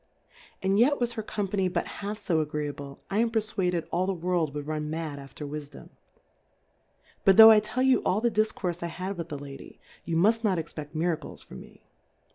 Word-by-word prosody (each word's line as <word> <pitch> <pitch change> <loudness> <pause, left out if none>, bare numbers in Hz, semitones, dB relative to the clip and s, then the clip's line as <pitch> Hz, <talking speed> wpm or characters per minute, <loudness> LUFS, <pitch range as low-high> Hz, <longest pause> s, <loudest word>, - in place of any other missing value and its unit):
And 195 +2 +2
yet 285 +5 +4
was 240 -1 0
her 230 -1 -4
Company 200 -2 -1
but 175 -1 -1 0.2
half 205 +1 -3
fo 175 -6 0
agreeable. 145 -2 -4
1 200 +2 0
am 235 - +2
perfwaded 195 -6 -1
all 185 +2 0
the 195 - 0
World 170 -3 0
wou'd 145 -1 -4
run 150 0 -3
Mad 155 -2 -4
after 140 +2 -9
Wifdom. 145 -1 -8 1.3
But, 195 -1 +5
tho' 225 0 +12
I 215 - +7
tell 215 +5 -2
you 265 -1 +4
all 190 - +1
the 235 +1 +1
Difcourfe 205 -5 -1
I 170 - -3
Jiad 185 +4 -5
with 170 -2 -5
tlie 145 -3 -6
Lady, 140 -1 -10 0.3
youmuft 200 +8 +2
not 195 -4 +2
expe£t 155 -1 -6
Miracles. 165 0 -2
from 65 - -11
me. - - -17
180 Hz, 190 wpm, -27 LUFS, 155-210 Hz, 1.3 s, tho